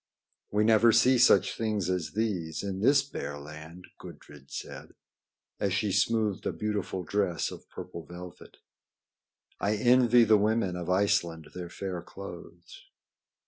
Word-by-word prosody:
"We 105 +1 +1
never 115 +1 +5
see 125 +3 +4
such 125 - +5
things 105 -5 -1
as 90 -3 -2
these 95 -8 -2
in 95 -1 -4
this 135 +6 +4
bare 75 - -6
land," 75 +4 -11
Gudrid 70 -2 -13
said, - - -8 0.6
as 100 -2 0
she 100 +2 0
smoothed 105 +1 +1
a - - 0
beautiful 105 -3 -3
dress 95 -3 -1
of - - -12
purple 85 - -8
velvet. 90 0 -11 1.0
"I 105 +2 0
envy 120 +1 +5
the 110 -1 +5
women 105 -3 +1
of 90 -1 -5
Iceland 85 -4 +1
their 90 -1 -7
fair 90 -1 -5
clothes." 85 -2 -11
100 Hz, 140 wpm, -28 LUFS, 85-110 Hz, 1.0 s, never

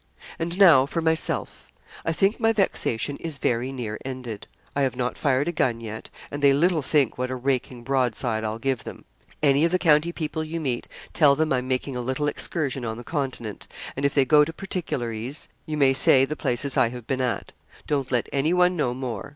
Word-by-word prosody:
And 170 +2 -2
now 160 -9 +7
for 165 - -2
myself: 160 -1 -2 0.3
I 165 - 0
think 195 +6 +1
my 225 -1 +3
vexation 145 - 0
is 160 -4 -5
very 125 0 0
near 115 -5 -5
ended. 125 -5 -6 0.3
I 140 - +1
have 135 -2 +1
not 125 0 -2
fired 140 0 +1
a - - +1
gun 125 -7 0
yet, 110 -1 -7 0.2
and 145 - -5
they 140 -1 +6
little 165 +3 +2
think 140 -3 +1
what 130 0 -1
a 130 - -2
raking 125 -1 -2
broadside 120 -4 0
I'll 110 0 -2
give 130 -1 -1
them. - - -9 0.4
Any 140 0 +4
of 165 - +3
the 185 - +3
county 160 -1 +3
people 160 -1 -3
you 160 +2 -4
meet, 130 -6 -2 0.3
tell 145 -3 +5
them 155 -1 +1
I'm 130 0 -1
making 130 +1 -2
a 125 - -2
little 130 +4 -1
excursion 140 -3 -1
on 110 -1 -3
the 120 - -8
Continent; 130 - -4 0.3
and 135 - -4
if 140 - +1
they 140 -2 +4
go 150 +3 +6
to 155 - -3
particularise, 135 - -4 0.2
you 155 -1 -3
may 135 -2 +5
say 130 0 +5
the 150 +3 -4
places 130 +1 -1
I 115 - +4
have 120 -1 -8
been 130 +1 -1
at. 125 -2 -2 0.3
Don't 140 -3 -1
let 120 -2 +1
anyone 180 +6 +3
know 125 -7 0
more. 125 -2 -5
135 Hz, 210 wpm, -25 LUFS, 125-155 Hz, 0.4 s, now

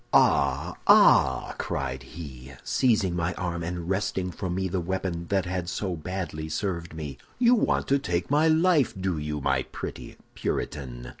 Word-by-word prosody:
"'Ah, 70 -1 +3
ah!' - - +6
cried 65 -1 -3
he, 65 -2 -10
seizing 105 -8 +2
my 85 +1 -1
arm, 85 -2 -3
and 85 0 -4
wresting 95 -1 -1
from 90 0 -4
me 95 0 0
the 95 +1 -1
weapon 90 -1 -3
that 95 0 +1
had 90 -1 -3
so 95 -2 -2
badly 80 -2 -5
served 85 0 -3
me, 75 -5 -6 0.2
'you 245 0 +5
want 235 - +2
to 140 +1 +3
take 90 -2 -2
my 150 +2 +4
life, 160 - +3
do 95 -4 -1
you, 75 0 -3
my 65 -1 +1
pretty - - -7 0.2
Puritan? 60 -4 -4
90 Hz, 160 wpm, -27 LUFS, 75-95 Hz, 0.2 s, ah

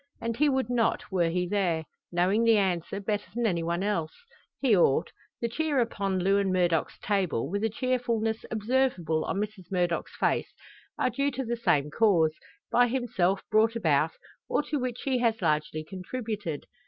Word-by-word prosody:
And 230 0 -2
he 295 +4 +3
would 265 -3 +1
not, 235 -4 0
were 175 -3 +2
he 180 +1 -1
there; 175 -5 0 0.3
knowing 185 +6 +2
the 230 -1 +5
answer, 185 -1 0
better 205 +1 -2
than 240 0 0
anyone 170 -2 0
else. 170 -6 -1 0.5
He 250 -6 +4
ought. 170 -2 +3 0.3
The 235 - +1
cheer 295 +3 0
upon 200 -5 0
Lewin 195 +1 +2
Murdock's 175 -3 +1
table, 190 - 0
with 200 +6 -2
a 225 - +2
cheerfulness 230 -2 -1
observable 215 -8 0
on - - -2
Mrs 205 -3 -5
Murdock's 175 -2 -1
face, - - +1 0.5
are 255 - +1
due 275 +4 0
to 265 -1 -4
the 235 +1 -1
same 150 -10 +1
cause, 170 -6 +3 0.4
by 245 0 +5
himself 225 -7 0
brought 220 +2 +4
about, 160 -6 +2 0.4
or - - +1
to 300 -1 -2
which 250 -1 -4
he 260 -2 +1
has 230 -2 +1
largely 155 -2 0
contributed. 200 - -5
205 Hz, 165 wpm, -28 LUFS, 175-235 Hz, 0.5 s, the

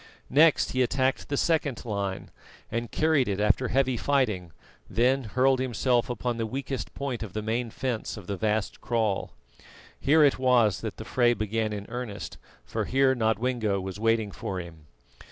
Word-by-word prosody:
Next 155 +3 +5
he 130 - +1
attacked 130 +1 0
the 140 - -1
second 150 -8 0
line, 100 -3 -3 0.4
and 115 0 -2
carried 155 -5 +2
it 100 -1 -1
after 105 +5 +2
heavy 130 +1 +1
fighting, 110 -11 0 0.4
then 130 +3 +2
hurled 130 +4 +2
himself 125 -1 +1
upon 120 0 -2
the 115 -1 -1
weakest 135 +2 -4
point 135 -4 -3
of 105 -5 -6
the 110 - -3
main 115 +2 -1
fence 120 -1 -3
of 105 - -9
the 100 - -3
vast 105 +1 -1
kraal. 110 -5 -1 0.7
Here 155 +2 +5
it 140 -3 +3
was 125 -6 +3
that - - -5
the - - -7
fray 120 -1 +3
began 110 0 -1
in 105 -1 -5
earnest, 120 -3 -6 0.3
for - - -2
here 135 0 +3
Nodwengo 110 -2 0
was 95 +1 -6
waiting 115 -2 +1
for 95 -1 -4
him. 80 -3 -10
120 Hz, 170 wpm, -27 LUFS, 105-130 Hz, 0.7 s, Next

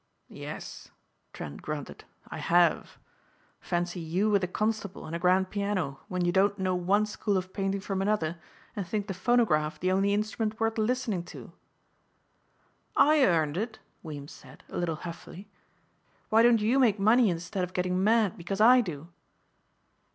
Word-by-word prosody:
"Yes," - - -8 0.4
Trent 70 - -8
grunted, 150 -2 -6 0.2
"I - - -7
have. 170 -2 +2 0.6
Fancy 175 +1 -2
you 180 +6 0
with 200 -2 +2
a - - +1
Constable 215 0 -3
and 160 - -5
a - - -3
grand 185 +1 +2
piano 200 -9 -2
when 180 -3 -1
you 175 - +2
don't 195 +2 +2
know 185 -1 0
one 190 +4 +2
school 210 -1 -1
of 185 0 -5
painting 195 0 -2
from 195 -1 -3
another 185 -5 -1 0.4
and 200 -4 -4
think 205 +2 -2
the 200 - -4
phonograph 175 -8 +1
the 185 +3 0
only 195 +2 +2
instrument 215 +1 -1
worth 225 0 0
listening 220 -4 0
to!" - - -11 1.4
"I 300 -1 +5
earned 160 - +2
it," 220 +2 -3 0.2
Weems 145 -3 -8
said, 130 +1 -15
a - - -6
little 170 -2 -1
huffily. 170 +4 -9 0.8
"Why 220 +1 +5
don't 235 -2 +5
you 235 +6 +2
make 220 -6 +3
money 220 +3 +5
instead 175 +3 -3
of 180 0 -5
getting 180 +1 0
mad 220 -2 +3
because 195 +4 -4
I 245 +3 +7
do?" 165 -5 -7
190 Hz, 160 wpm, -28 LUFS, 175-215 Hz, 1.4 s, I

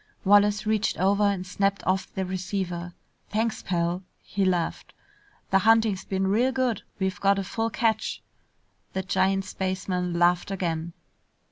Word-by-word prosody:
Wallace 205 +1 +4
reached 215 0 +1
over 200 +3 +2
and 200 -3 +1
snapped 195 +2 -1
off 190 +1 0
the 190 - -1
receiver. 180 -2 -4 0.3
"Thanks, 220 +2 -1
pal." 175 0 -1 0.2
He 200 - -2
laughed. 175 -3 -1 0.6
"The 195 - +5
hunting's 220 -2 +3
been 190 0 -1
real 230 +7 +2
good! 255 -5 0 0.2
We've 190 +1 -2
got 200 0 +4
a 195 - -1
full 225 +4 -2
catch!" 225 -1 -1 0.7
The 190 - -2
giant 190 +1 +1
spaceman 185 -2 -2
laughed 175 +1 +3
again. 170 -3 -2
190 Hz, 140 wpm, -26 LUFS, 185-205 Hz, 0.7 s, The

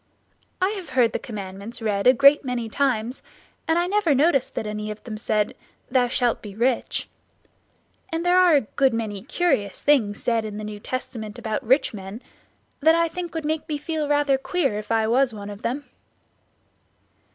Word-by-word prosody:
I 370 - +2
have 390 -5 -6
heard 235 -3 +4
the - - -1
commandments 205 0 -7
read 210 -1 0
a 255 - +8
great 280 +3 +6
many 245 -3 -3
times 250 -1 -1 0.5
and 325 +1 +3
I 345 - +2
never 370 -5 +2
noticed 275 -2 +2
that - - -2
any 210 0 -4
of 210 0 -7
them 225 -3 -6
said, 210 -1 0 0.4
'Thou 250 -1 +3
shalt 245 -1 0
be 205 -2 -9
rich'; 240 +3 0 1.0
and 330 +1 -2
there 355 +1 +5
are 355 -4 +6
a 285 - +5
good 265 +2 +1
many 210 -3 -3
curious 230 - 0
things 225 -9 +2
said 230 -2 0
in 210 -1 -6
the 215 - -5
New 210 -1 -6
Testament 220 -2 -5
about 220 -3 -3
rich 260 +3 +2
men 195 +1 -7 0.6
that 320 +3 +5
I 335 0 +2
think 345 0 -6
would 320 -2 -3
make 315 +1 -2
me 300 - -1
feel 305 0 -3
rather 290 -2 +2
queer 270 - 0
if 215 - -8
I 225 -1 +3
was 245 0 +2
one 205 0 -7
of 205 +1 -10
them." 275 +5 -3
250 Hz, 185 wpm, -24 LUFS, 215-295 Hz, 1.0 s, a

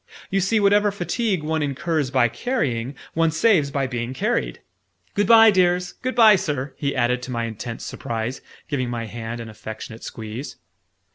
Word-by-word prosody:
You 195 - +2
see, 215 +4 +2
whatever 205 0 +4
fatigue 195 -1 -1
one 160 +1 -1
incurs 150 0 -1
by 130 -2 +3
carrying, 135 - -2 0.2
one 165 0 +2
saves 160 -3 +3
by 140 -1 -1
being 120 0 -4
carried! - - -1 0.5
Good 205 -1 +1
bye, 225 -1 +8
dears! 180 -1 +2
Good 255 +1 -4
bye, 220 -4 +7
Sir!" 145 -5 -3
he 140 -1 -2
added 125 0 +1
to 125 - -6
my 115 -1 -1
intense 115 +1 -5
surprise, 115 +2 -4 0.3
giving 130 -4 -2
my 120 -1 -3
hand 115 +2 -6
an 115 - -7
affectionate 110 +1 -9
squeeze. 110 +5 -7
140 Hz, 165 wpm, -23 LUFS, 120-185 Hz, 0.5 s, bye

